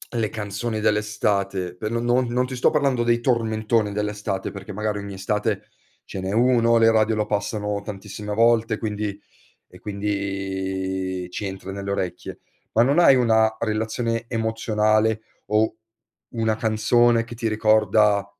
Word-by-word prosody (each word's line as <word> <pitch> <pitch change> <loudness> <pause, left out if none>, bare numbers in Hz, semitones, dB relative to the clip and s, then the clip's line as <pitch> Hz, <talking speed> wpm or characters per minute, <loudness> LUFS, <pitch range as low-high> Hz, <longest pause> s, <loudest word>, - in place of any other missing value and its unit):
le 110 -3 0
canzoni 110 +2 -4
dell'estate? 100 -4 0
Per 105 +4 -4
non 115 0 -1 0.2
non 125 +1 0
ti 130 0 -6
sto 125 - +3
parlando 135 -5 +1
dei 120 0 +2
tormentoni 110 -3 +1
dell'estate, 105 -2 -3
perché 100 +1 -8
magari 105 0 -2
ogni 100 0 -7
estate 105 +1 -2 0.4
ce - - -7
n'è 95 +1 -3
1, 115 0 +4
le 115 0 +5
radio 110 0 +2
lo 105 - 0
passano 105 0 -2
tantissime 105 0 -6
volte, 115 0 +3
quindi 105 -2 -3 0.5
e - - -16
quindi 95 -2 -3
ci 105 - -4
entra 95 0 -6
nelle 100 0 -5
orecchie. 90 -2 -4 0.3
Ma 115 - +5
non 140 +6 +3
hai 140 -6 +7
una 110 -2 +3
relazione 115 +1 -1
emozionale 110 -1 +1 0.3
o 110 +1 +1 0.6
una 110 -1 +1
canzone 115 +2 +3
che 120 +1 -10
ti 115 0 -2
ricorda 110 -2 +3
110 Hz, 145 wpm, -23 LUFS, 100-115 Hz, 0.6 s, hai